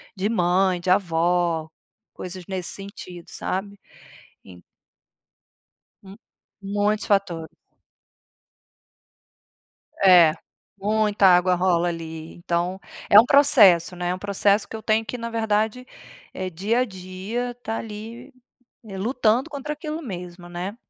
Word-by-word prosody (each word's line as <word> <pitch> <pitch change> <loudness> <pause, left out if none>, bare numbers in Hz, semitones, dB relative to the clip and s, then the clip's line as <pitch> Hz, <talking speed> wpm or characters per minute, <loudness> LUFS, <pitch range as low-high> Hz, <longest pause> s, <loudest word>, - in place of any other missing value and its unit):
de 200 +1 -1
mãe, 185 -2 +2
de 180 - -3
avó, 170 -3 +1 0.4
coisas 185 0 -8
nesse 185 -2 -4
sentido, 185 -3 -10
sabe? 200 +2 -5 0.7
En 90 -2 -14 1.4
Hum. 195 0 -13 0.4
Muitos 205 +2 -1
fatores. 170 -6 -1 2.5
É, 175 -5 +7 0.5
muita 210 0 +2
água 180 0 +5
rola 175 -1 +1
ali. 160 -1 -7
Então, 175 +2 -2 0.3
é 205 - +9
um - - +1
processo, 210 - +5
né, 175 0 -3
é 180 - 0
um - - -7
processo 200 +1 +1
que - - -11
eu 220 - -9
tenho 220 +1 +1
que, 250 - -6
na 230 0 -5
verdade, 220 +2 -1 0.5
eh, 185 0 -4
dia 205 +8 0
a - - +2
dia 195 +4 -5
tá 225 -1 -3
ali 225 +5 -9 0.5
lutando 225 +5 0
contra 295 0 -5
aquilo 305 +1 -6
mesmo, 180 -5 -8
né? 180 +4 -6
195 Hz, 120 wpm, -23 LUFS, 175-220 Hz, 2.5 s, é